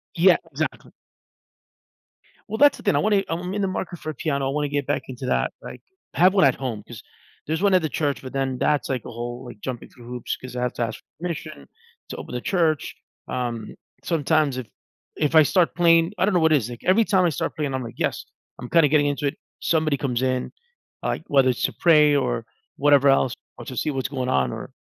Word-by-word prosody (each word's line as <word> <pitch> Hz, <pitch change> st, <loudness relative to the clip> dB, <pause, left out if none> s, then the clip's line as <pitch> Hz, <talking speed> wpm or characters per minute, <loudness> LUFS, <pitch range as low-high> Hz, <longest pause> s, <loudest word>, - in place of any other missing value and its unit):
Yeah, -, -, +6 dB
exactly. -, -, -4 dB, 1.6 s
Well, 220 Hz, -, -3 dB
that's 290 Hz, +1 st, +5 dB
the -, -, -13 dB
thing, 200 Hz, -, +2 dB
I -, -, +3 dB
want 210 Hz, 0 st, +2 dB
it 195 Hz, -1 st, +1 dB
I'm 180 Hz, +3 st, -3 dB
in 205 Hz, -, -1 dB
the 195 Hz, -, +1 dB
market 185 Hz, -2 st, -4 dB
for 155 Hz, -, -6 dB
a -, -, -3 dB
piano. 140 Hz, -4 st, -1 dB
I -, -, -2 dB
want 150 Hz, 0 st, 0 dB
to 145 Hz, -, -3 dB
get 145 Hz, -2 st, -1 dB
back 145 Hz, -1 st, -1 dB
into 130 Hz, 0 st, -7 dB
that, -, -, +1 dB
like, -, -, -9 dB, 0.3 s
I -, -, -7 dB
have 185 Hz, +2 st, +6 dB
one 195 Hz, -, +4 dB
at 135 Hz, -, +4 dB
home 120 Hz, -6 st, -4 dB
'cause 120 Hz, -3 st, -9 dB, 0.5 s
there's 160 Hz, +3 st, -1 dB
one 200 Hz, -1 st, +3 dB
at 185 Hz, -, +5 dB
the 155 Hz, -, -2 dB
church, 145 Hz, +1 st, -1 dB
but 130 Hz, 0 st, -9 dB
then 135 Hz, -1 st, -1 dB
that's 150 Hz, +2 st, +1 dB
like 130 Hz, -4 st, -2 dB
a -, -, -7 dB
whole 120 Hz, +2 st, -6 dB
like 120 Hz, -3 st, -10 dB
jumping 125 Hz, 0 st, -6 dB
through 120 Hz, -2 st, -16 dB
hoops 125 Hz, -1 st, -4 dB
'cause 130 Hz, -1 st, -10 dB
I 125 Hz, -, -2 dB
have 125 Hz, 0 st, -1 dB
to -, -, -2 dB
ask 115 Hz, -1 st, -4 dB, 0.2 s
permission 165 Hz, -, -6 dB, 0.4 s
to -, -, -5 dB
open -, -, -8 dB
the 125 Hz, -, -3 dB
church, 165 Hz, -5 st, 0 dB, 0.3 s
um, 120 Hz, -3 st, -4 dB, 0.3 s
sometimes 155 Hz, -4 st, +1 dB
if 125 Hz, -4 st, -5 dB, 0.5 s
if 150 Hz, +1 st, 0 dB
I 155 Hz, -, +9 dB
start 175 Hz, +3 st, +2 dB
playing 165 Hz, 0 st, +4 dB
I -, -, +3 dB
don't 205 Hz, -, +1 dB
know 180 Hz, -, +4 dB
what 160 Hz, 0 st, +4 dB
is 125 Hz, -6 st, +1 dB
like 120 Hz, -, -9 dB
every 205 Hz, +5 st, +4 dB
time 190 Hz, -3 st, +3 dB
I -, -, +3 dB
start 150 Hz, -, -3 dB
playing, 145 Hz, -3 st, -2 dB
I'm 130 Hz, -, -2 dB
like, 115 Hz, -, -8 dB
yes, -, -, -2 dB, 0.3 s
I'm 125 Hz, -, -7 dB
kinda 165 Hz, -3 st, +5 dB
getting 145 Hz, 0 st, +3 dB
into 145 Hz, 0 st, -1 dB
it. -, -, -3 dB, 0.2 s
Somebody 155 Hz, -3 st, +1 dB
comes 125 Hz, -3 st, -1 dB
in, 130 Hz, -1 st, -1 dB, 0.5 s
like, -, -, -2 dB
whether 135 Hz, -2 st, +4 dB
it's 125 Hz, -, -1 dB
to -, -, 0 dB
pray 150 Hz, -3 st, +5 dB
or -, -, 0 dB, 0.3 s
whatever 140 Hz, -1 st, +5 dB
else 135 Hz, -2 st, +3 dB, 0.2 s
or -, -, -9 dB
to 130 Hz, -, -7 dB
see 150 Hz, -, 0 dB
what's 135 Hz, -1 st, -2 dB
going 130 Hz, -2 st, -3 dB
on 65 Hz, -2 st, +1 dB
or -, -, -7 dB
145 Hz, 240 wpm, -23 LUFS, 125-165 Hz, 1.6 s, I